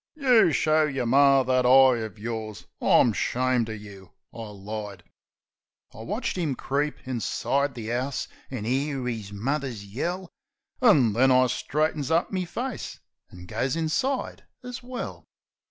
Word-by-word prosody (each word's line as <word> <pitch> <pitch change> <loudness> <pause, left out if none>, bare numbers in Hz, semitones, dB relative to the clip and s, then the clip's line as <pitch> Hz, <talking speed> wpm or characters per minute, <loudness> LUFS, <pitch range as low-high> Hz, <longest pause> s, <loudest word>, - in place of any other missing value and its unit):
"You 250 - +4
show 155 +1 +3
yer 135 -4 -2
Mar 135 +1 +5
that 130 0 +2
eye - - +2
uv 125 -5 +5
yours. 110 -2 -6 0.2
I'm 115 - +4
'shamed 125 +1 0
uv 110 -1 -6
you!" 100 -3 -12 0.2
I 115 -2 -7
lied. 100 -2 -7 0.9
I - - -12
watch 205 - -3
'im 160 -7 -1
creep 145 +2 -2
inside 135 +3 -1
the 115 -1 -4
'ouse, 130 +2 -2 0.2
an' 125 -5 -5
'ear 135 +1 -1
'is 110 -5 -4
mother's 125 0 -3
yell. 175 - -4 0.5
An' 145 - +5
then 130 +5 +4
I 130 0 +5
straightens 150 +3 -1
up 165 +1 +1
me 185 -2 -1
face 240 +7 -5 0.3
an' 90 0 -12
goes 130 - -2
inside 210 - -1 0.2
as 250 0 -7
well. 250 0 -7
130 Hz, 145 wpm, -26 LUFS, 110-155 Hz, 0.9 s, Mar